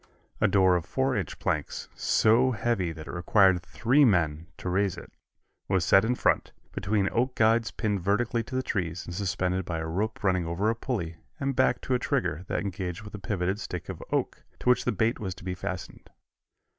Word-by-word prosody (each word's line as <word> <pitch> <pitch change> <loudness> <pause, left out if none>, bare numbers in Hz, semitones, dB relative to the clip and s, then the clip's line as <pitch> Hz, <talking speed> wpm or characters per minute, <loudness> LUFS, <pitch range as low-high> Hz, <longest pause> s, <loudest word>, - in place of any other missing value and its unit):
A - - +4
door 95 -2 +4
of 85 - 0
four 130 -1 0
inch 95 -8 -3
planks, - - -2
so 115 +4 +3
heavy 105 -5 0
that 80 -1 -9
it - - -7
required 95 +1 +4
three 120 +10 +2
men 85 - +2
to - - -7
raise 95 +1 +1
it, - - -10 0.6
was 95 -3 +1
set 95 +3 +6
in 120 +2 +1
front, - - +1 0.2
between 100 0 0
oak 125 +2 0
guides 115 +1 +3
pinned 105 -4 -2
vertically 115 +5 +1
to 130 - -7
the 130 - 0
trees 90 -6 -2
and 90 - -7
suspended 95 -1 -1
by 85 -2 -3
a 80 - -3
rope 100 +8 -2
running 90 -3 +1
over 95 +6 +1
a - - -2
pulley 90 -10 -3 0.2
and 140 -1 -1
back 125 - +2
to 130 - -2
a 125 - +2
trigger 80 -6 -1
that - - -1
engaged 95 -1 -4
with 105 - -10
a 105 - -6
pivoted 95 0 -1
stick - - -6
of - - -6
oak, - - -1 0.2
to - - -1
which 125 - +1
the - - +2
bait 115 +1 0
was 95 -4 -4
to - - -13
be 90 0 -3
fastened. 95 -1 -6
100 Hz, 205 wpm, -28 LUFS, 90-115 Hz, 0.6 s, set